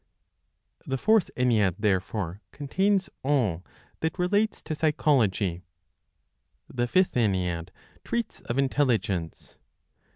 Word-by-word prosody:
The 135 - -1
Fourth 215 - +3
Ennead, 110 -8 +2
therefore, 100 -2 -1
contains 190 +7 0
all 120 - +1 0.4
that 160 +2 -2
relates 205 +4 +1
to 155 - -4
Psychology. 125 - +1 1.1
The 120 -1 -2
Fifth 185 +8 +3
Ennead 90 -7 0 0.3
treats 235 -2 -3
of 120 0 -4
Intelligence. 120 - 0
125 Hz, 95 wpm, -27 LUFS, 95-160 Hz, 1.1 s, Fourth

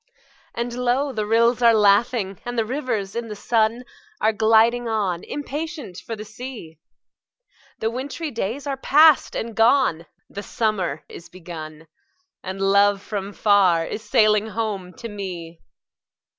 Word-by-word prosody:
And 235 0 -3
low 250 +3 0
the 215 -2 -2
rills 235 +2 +3
are 230 -1 +6
laughing, 205 -1 +2
and 245 0 -5
the 225 - +1
rivers 230 -6 -3
in 235 0 -3
the 210 - -6
sun 225 +2 0 0.4
Are 220 +1 +2
gliding 225 +2 +3
on, 200 -6 -1
impatient 295 - -6
for 230 - -6
the 215 0 -8
sea; 220 - -9 1.0
The 225 - -2
wintry 285 +5 -5
days 230 +4 -4
are 275 -1 -3
past 300 +3 +5
and 230 0 -4
gone, 225 - +3 0.2
the 200 - -7
summer 195 -9 -2
is 170 - -12
begun, 160 -3 -9 0.6
And 190 +1 -6
love 200 +1 +3
from 200 -2 -5
far 195 -6 +3
is 215 - -6
sailing 215 -2 +3
home 210 -4 -4
to 245 -2 -8
me! 180 -6 -7
220 Hz, 145 wpm, -22 LUFS, 195-240 Hz, 1.0 s, are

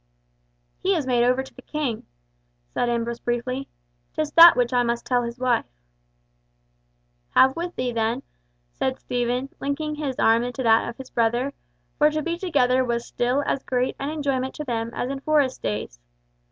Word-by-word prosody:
"He 385 +1 +1
is 310 -5 -1
made 245 -2 +2
over 250 +2 +2
to 265 - -14
the 255 - -13
King," 275 -6 -3 0.7
said 245 - 0
Ambrose 235 0 -2
briefly. 255 +3 -2 0.5
"'Tis 310 -1 -1
that 335 +1 +9
which 245 0 +1
I 245 - +4
must 235 0 -1
tell 250 -1 +2
his 235 0 -5
wife." 250 -2 +1 1.7
"Have 265 0 +6
with 345 +1 -4
thee, 250 -1 -1
then," 230 +3 -1 0.5
said 260 - -2
Stephen, 245 +2 -2
linking 300 +2 -2
his 290 -4 -4
arm 225 +1 +4
into 245 +2 -4
that 225 -1 +4
of 235 - -9
his 265 -1 -10
brother, 240 +4 +1 0.5
for 300 0 +6
to 305 0 -2
be 340 +2 -1
together 260 -8 +2
was 235 -1 -2
still 250 +4 0
as 275 - -1
great 255 -1 -1
an 275 - -2
enjoyment 275 -4 -2
to 300 - -5
them 230 -4 -2
as 250 - -2
in 275 - -4
Forest 290 -3 +1
days. 105 - -4
255 Hz, 175 wpm, -24 LUFS, 240-280 Hz, 1.7 s, that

